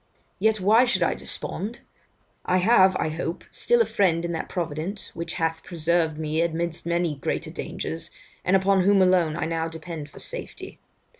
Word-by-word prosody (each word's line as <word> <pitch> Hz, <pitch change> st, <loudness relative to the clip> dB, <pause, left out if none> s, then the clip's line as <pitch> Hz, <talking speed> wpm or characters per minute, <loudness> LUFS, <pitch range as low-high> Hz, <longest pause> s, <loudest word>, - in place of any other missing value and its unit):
Yet 215 Hz, +2 st, +2 dB
why 215 Hz, +6 st, +5 dB
should 245 Hz, -, +2 dB
I -, -, +2 dB
despond? 220 Hz, +5 st, -5 dB, 0.6 s
I 185 Hz, -, +2 dB
have, 190 Hz, -1 st, +5 dB
I 160 Hz, -, 0 dB
hope, 165 Hz, +2 st, -4 dB
still 480 Hz, 0 st, +3 dB
a -, -, +4 dB
friend 170 Hz, -4 st, +1 dB
in 170 Hz, -, -2 dB
that 165 Hz, -, -4 dB
Providence 170 Hz, +3 st, -4 dB
which 170 Hz, 0 st, -4 dB
hath 165 Hz, 0 st, -1 dB
preserved 165 Hz, -2 st, 0 dB
me 155 Hz, +1 st, -1 dB
amidst 170 Hz, 0 st, -2 dB
many 170 Hz, -3 st, 0 dB
greater 135 Hz, -, -3 dB
dangers, 80 Hz, +1 st, -5 dB, 0.3 s
and 185 Hz, -, +3 dB
upon 190 Hz, 0 st, +3 dB
whom 195 Hz, +1 st, +5 dB
alone 180 Hz, -4 st, +3 dB
I 165 Hz, -, -1 dB
now 165 Hz, 0 st, -1 dB
depend 160 Hz, -2 st, -7 dB
for -, -, -16 dB
safety. -, -, -5 dB
170 Hz, 170 wpm, -25 LUFS, 160-190 Hz, 0.6 s, why